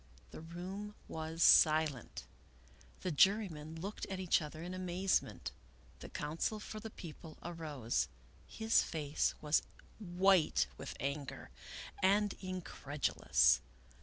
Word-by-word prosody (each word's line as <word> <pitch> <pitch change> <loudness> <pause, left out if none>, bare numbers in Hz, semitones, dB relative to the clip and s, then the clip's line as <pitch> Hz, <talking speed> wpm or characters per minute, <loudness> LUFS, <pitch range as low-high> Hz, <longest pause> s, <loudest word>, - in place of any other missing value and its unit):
The - - -9
room 185 +5 -6
was 160 +1 -2
silent. 155 -5 +5 0.8
The 185 - -1
jurymen 165 -3 +2
looked 200 +5 -5
at 190 -1 -4
each 185 -3 +3
other 155 +1 -7
in 180 +1 -5
amazement. 185 +1 -1 0.5
The - - -9
counsel 160 +8 -2
for 215 +1 -7
the 220 - -7
People 160 -4 -10
arose. 150 - -2 0.4
His 225 0 +3
face 150 -2 -1
was 150 +1 +3 0.4
white 185 -3 +3
with - - -7
anger, 140 +1 -4 0.5
and 200 +2 +3
in 185 -1 -4
credulous. 145 - +2
170 Hz, 115 wpm, -35 LUFS, 150-190 Hz, 0.8 s, silent